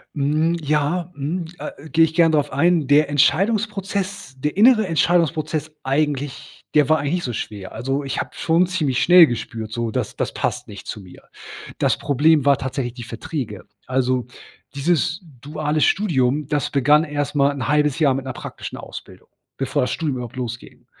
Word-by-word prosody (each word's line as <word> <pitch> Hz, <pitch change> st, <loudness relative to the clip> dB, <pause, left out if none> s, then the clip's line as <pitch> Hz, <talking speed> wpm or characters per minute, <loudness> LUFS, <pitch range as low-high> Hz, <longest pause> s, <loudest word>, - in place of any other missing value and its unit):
Mhm, 155 Hz, +4 st, +1 dB
ja 155 Hz, +4 st, 0 dB
mhm, 160 Hz, +5 st, -3 dB
äh, 150 Hz, +1 st, -8 dB
gehe 165 Hz, 0 st, +5 dB
ich 160 Hz, -, -5 dB
gern 165 Hz, -2 st, +4 dB
drauf 150 Hz, -2 st, +1 dB
ein. 160 Hz, 0 st, +2 dB
Der 145 Hz, +1 st, +4 dB
Entscheidungsprozess 195 Hz, -, 0 dB
der 150 Hz, +4 st, -2 dB
innere 220 Hz, -2 st, +5 dB
Entscheidungsprozess 155 Hz, -2 st, 0 dB
eigentlich 140 Hz, 0 st, -2 dB
der 150 Hz, -1 st, +4 dB
war 155 Hz, 0 st, +4 dB
eigentlich 145 Hz, +3 st, -2 dB
nicht 175 Hz, -, -3 dB
so 125 Hz, -, -2 dB
schwer. 105 Hz, -4 st, -6 dB
Also, 135 Hz, +5 st, -2 dB
ich 135 Hz, -, -3 dB
habe -, -, -4 dB
schon 170 Hz, +2 st, +2 dB
ziemlich 145 Hz, -9 st, 0 dB
schnell 175 Hz, +1 st, +8 dB
gespürt 110 Hz, -2 st, -5 dB
so: 115 Hz, 0 st, -2 dB
„Das -, -, -3 dB
das -, -, -2 dB
passt -, -, -2 dB
nicht 100 Hz, -1 st, -11 dB
zu 105 Hz, -, -5 dB
mir.“ 90 Hz, -2 st, -15 dB, 0.6 s
Das -, -, +2 dB
Problem 145 Hz, +1 st, +3 dB
war 140 Hz, -1 st, +5 dB
tatsächlich 130 Hz, -2 st, -3 dB
die 120 Hz, -2 st, -8 dB
Verträge. 115 Hz, -, -6 dB, 0.2 s
Also, 130 Hz, -1 st, 0 dB, 0.5 s
dieses 165 Hz, +4 st, 0 dB, 0.2 s
duale 150 Hz, +1 st, -2 dB
Studium, 145 Hz, -7 st, +1 dB
das 145 Hz, -3 st, -1 dB
begann 145 Hz, +3 st, +4 dB
erst 145 Hz, -1 st, -3 dB
mal 140 Hz, 0 st, +3 dB
'n 135 Hz, -2 st, -4 dB
halbes 150 Hz, -1 st, +2 dB
Jahr 140 Hz, -4 st, +4 dB
mit 135 Hz, 0 st, -4 dB
'ner 130 Hz, -, -4 dB
praktischen -, -, -8 dB
Ausbildung, -, -, -11 dB, 0.3 s
bevor -, -, 0 dB
das 125 Hz, -, -1 dB
Studium 150 Hz, -5 st, -2 dB
überhaupt 120 Hz, 0 st, -7 dB
losging. 120 Hz, -1 st, -7 dB
145 Hz, 175 wpm, -21 LUFS, 130-160 Hz, 0.6 s, schnell